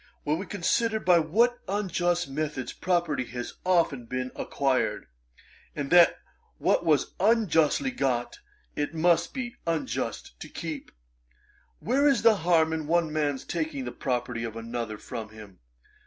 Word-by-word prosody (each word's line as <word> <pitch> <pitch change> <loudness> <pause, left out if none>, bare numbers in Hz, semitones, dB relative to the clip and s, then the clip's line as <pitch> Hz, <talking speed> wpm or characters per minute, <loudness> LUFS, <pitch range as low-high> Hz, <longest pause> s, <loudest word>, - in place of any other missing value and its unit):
When 150 +2 0
we 190 - -6
consider 220 +7 0
by 180 -4 +4
what 230 +10 +2
unjust 175 -3 0
methods 140 -2 -3
property 170 -6 0
has 120 +1 -6
been - - -26
often 130 -8 0
acquired, 135 -2 0 0.7
and 140 -2 -4
that 175 -1 +7 0.4
what - - +2
was 155 -4 +2
unjustly 210 - +3
got 130 - -1 0.4
it 145 +2 -2
must 170 +1 +3
be 245 -3 -5
unjust 160 - -3
to - - -8
keep, - - -6 0.9
where 275 +6 +2
is 275 -5 +3
the 225 -2 +6
harm 160 -2 +3
in 160 -2 -3
one 165 -1 +1
man's 145 -3 -1
taking 155 -5 -3
the 120 - -4
property 125 -3 -2
of 115 -2 -5
another 115 -1 -4
from 110 0 -7
him? 105 -3 -13
160 Hz, 140 wpm, -27 LUFS, 130-180 Hz, 0.9 s, that